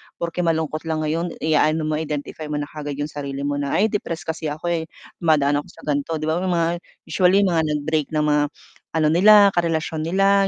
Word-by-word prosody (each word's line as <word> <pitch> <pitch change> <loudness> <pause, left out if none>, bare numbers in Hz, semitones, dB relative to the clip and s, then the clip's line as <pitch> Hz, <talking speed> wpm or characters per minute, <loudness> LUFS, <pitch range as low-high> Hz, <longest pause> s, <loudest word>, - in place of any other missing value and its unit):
porke 170 +1 -4
malungkot 160 -2 -1
lang 155 -1 -1
ngayon 165 +3 -2
i-aano 155 0 +2
mo 155 0 -1
identify 150 0 -5
mo 150 - -3
na 145 - -1
kaagad 145 -2 -5
yung 145 +1 -4
sarili 140 -1 -5
mo 145 0 -1
na 140 -1 -1
ay 215 +2 +2
depressed 170 -5 -3
kasi 160 -1 -5
ako, 155 +4 -3
eh, 165 -1 -1 0.3
dumadaan 145 -3 +3
ako - - -9
sa - - -16
ganito, 145 +2 -1
'di 155 - -5
ba, 160 +2 0
may 185 - -2
mga, 165 -1 +2 0.4
usually 190 +2 +3
mga 170 -4 +2
nag-break 150 +1 -1
ng 150 - +2
mga 150 -1 +3 0.5
ano 155 -1 +3
nila 200 +3 +7
karelasyon 160 -2 -1
nila 195 +2 +3
160 Hz, 205 wpm, -22 LUFS, 150-170 Hz, 0.5 s, nila